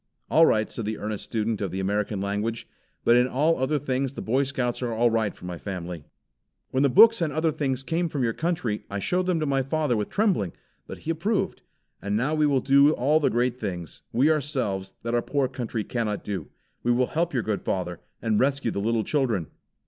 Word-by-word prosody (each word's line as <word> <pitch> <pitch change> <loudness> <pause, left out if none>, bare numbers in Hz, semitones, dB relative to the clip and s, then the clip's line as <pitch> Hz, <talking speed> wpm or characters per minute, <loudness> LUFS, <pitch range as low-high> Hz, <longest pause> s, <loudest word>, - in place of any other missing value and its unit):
"All 165 +1 +6
right," 110 0 +2
said 115 - -4
the 110 0 -2
earnest 105 -1 -4
student 110 -1 -2
of 100 - -1
the 95 +3 -4
American 100 +1 -1
language, 105 +3 -2 0.4
"but 120 - +6
in 125 +1 +4
all 150 +5 +1
other 135 +4 +1
things 135 -1 -1
the - - -6
Boy 130 +5 +2
Scouts 130 -3 -2
are 120 -2 -1
all 115 +1 +2
right 110 -2 +1
for - - -12
my 90 -2 -5
family." 90 -5 -6 0.7
"When 130 - +1
the 140 - +4
books 225 - +7
and 160 -3 +1
other 160 +2 +1
things 135 -4 -1
came 165 +4 -1
from 140 -4 -2
your 115 -1 +1
country, 140 -11 -2
I 100 - -3
showed 180 - 0
them 180 -3 +1
to 155 - 0
my 135 -2 +1
father 140 -1 0
with 105 -2 -2
trembling; 190 - +1 0.3
but - - -7
he 165 - 0
approved. 195 +7 -1 0.4
And 100 +1 -1
now 130 +7 0
we 155 -1 +3
will 135 -3 +2
do 140 +2 +6
all 150 +4 +3
the 150 - +2
great 125 +1 0
things, 90 - -5
we 140 +6 +4
ourselves, 125 -11 -2
that 115 0 -2
our 120 - +3
poor 140 0 0
country 120 -4 -4
cannot 110 -4 -2
do. 95 -9 -4 0.3
We 120 - +1
will 125 +1 +3
help 170 +6 -1
your 125 -5 0
good 105 -2 -2
father, 90 -2 -2 0.2
and 110 -2 +2
rescue 140 -3 +1
the 100 - -2
little 115 +1 +1
children." 120 - 0
125 Hz, 220 wpm, -26 LUFS, 105-145 Hz, 0.7 s, books